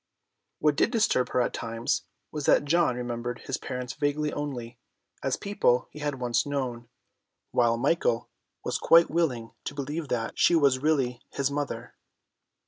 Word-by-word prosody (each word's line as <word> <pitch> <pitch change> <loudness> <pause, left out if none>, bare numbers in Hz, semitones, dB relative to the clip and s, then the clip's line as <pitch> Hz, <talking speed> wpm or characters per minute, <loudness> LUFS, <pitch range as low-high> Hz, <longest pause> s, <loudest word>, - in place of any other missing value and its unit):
What 150 -1 +2
did - - +3
disturb 220 - +2
her 125 - +2
at - - 0
times 115 +4 -2 0.3
was 150 -2 -4
that - - +5
John 165 -3 +3
remembered 120 0 -4
his 135 - -3
parents 125 -1 -5
vaguely 150 +1 0
only, 125 -5 -5 0.4
as 135 - 0
people 200 -12 +1
he 150 - -10
had 145 -1 -1
once 120 -2 +1
known, 125 -5 -3 0.6
while 120 -1 +3
Michael 120 -3 +1 0.4
was - - -1
quite 165 0 +6
willing 135 -9 0
to - - -5
believe 145 +3 -3
that 115 -3 -2
she 175 - +5
was 140 -5 +4
really 135 -5 +1
his 140 0 -1
mother. 145 0 -4
135 Hz, 155 wpm, -27 LUFS, 120-150 Hz, 0.6 s, quite